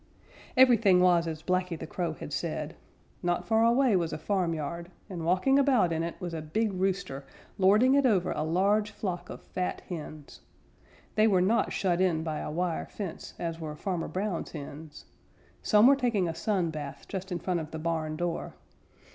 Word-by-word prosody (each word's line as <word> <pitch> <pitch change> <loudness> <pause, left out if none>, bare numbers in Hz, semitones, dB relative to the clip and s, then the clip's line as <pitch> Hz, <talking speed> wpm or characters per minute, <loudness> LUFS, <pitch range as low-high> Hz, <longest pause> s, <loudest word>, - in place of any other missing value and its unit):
Everything 230 -8 +6
was 175 -2 +4
as 160 -1 -5
Blacky 180 -2 0
the - - -6
Crow 170 0 -3
had 150 - -8
said. 160 -1 -3 0.5
Not 175 -1 0
far 225 0 +3
away 235 -1 +4
was 170 -3 0
a - - -3
farmyard, 170 -3 -2 0.2
and 180 -5 -6
walking 185 +11 +3
about 255 -11 +3
in 160 - -1
it 170 0 -3
was 175 -3 -5
a 160 - -3
big 205 +8 -1
rooster, 185 -7 -2 0.4
lording 210 +7 +5
it 280 0 +4
over 195 -8 +2
a - - -2
large 200 +6 +2
flock 185 -4 -5
of - - -9
fat 180 -1 -3
hens. 155 -4 -8 0.7
They 215 +1 +4
were 195 -4 +4
not 200 +6 +2
shut 180 -2 0
in 170 -4 +2
by 155 -2 -3
a - - -4
wire 170 +2 -2
fence 195 -6 -7
as 165 -1 -4
were 155 -2 -5
Farmer 175 +1 -3
Brown's 190 -2 -3
hens. 150 0 -9 0.6
Some 210 0 +5
were 275 +2 +8
taking 235 -9 +1
a 165 - -2
sun 170 0 0
bath 145 -3 -7
just 190 0 -5
in 175 - -1
front 175 0 -1
of 155 -1 -6
the 160 - -6
barn 160 -1 -2
door. 175 +1 -3
180 Hz, 185 wpm, -29 LUFS, 165-205 Hz, 0.7 s, were